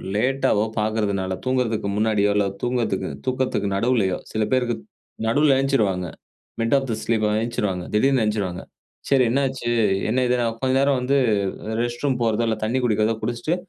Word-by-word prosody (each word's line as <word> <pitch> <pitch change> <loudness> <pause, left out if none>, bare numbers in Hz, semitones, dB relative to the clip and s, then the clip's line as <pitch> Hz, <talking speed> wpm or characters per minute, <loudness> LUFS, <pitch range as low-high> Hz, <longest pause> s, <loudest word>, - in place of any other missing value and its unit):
லேட்டாவோ 125 -2 +2 0.2
பாக்குறதுனால, 105 -3 -1
தூங்குறதுக்கு 120 -5 0
முன்னாடியோ, 105 -1 +2
இல்லை 100 -1 +2
தூங்கதுக்கு 120 -5 -1 0.2
தூக்கத்துக்கு 130 -5 -1
நடுவுலயோ, 105 -3 +1
சில 110 - 0
பேருக்கு 125 -2 +1 0.5
நடுவுல 140 +3 +4
ஏந்த்ச்சிருவாங்க. 105 -10 +1 0.5
மிட் 115 +4 +2
ஆஃப் 135 0 -2
தி - - 0
ஸ்லீப் 110 -2 +1 0.2
ஏந்த்ச்சிடுவாங்க 105 -6 -2
திடீர்னு 130 +3 +3
ஏந்த்ச்சிடுவாங்க. 100 -4 -2 0.5
சரி 135 -2 +4
என்னாச்சு? 130 -2 -1 0.4
என்ன 125 +4 +1
இதுன்னா? 120 -1 +1
கொஞ்ச 130 +1 0
நேரம் 140 -1 +2
வந்து 135 +3 +2 0.6
ரெஸ்ட் 120 +1 -3
ரூம் 130 -3 +1
போறதோ, 115 0 +1
இல்ல 110 -1 0
தண்ணீ 120 +4 0
குடிக்கிறதோ 110 0 +2
குடிச்சிட்டு, 120 +8 -1
115 Hz, 145 wpm, -23 LUFS, 105-130 Hz, 0.6 s, நடுவுல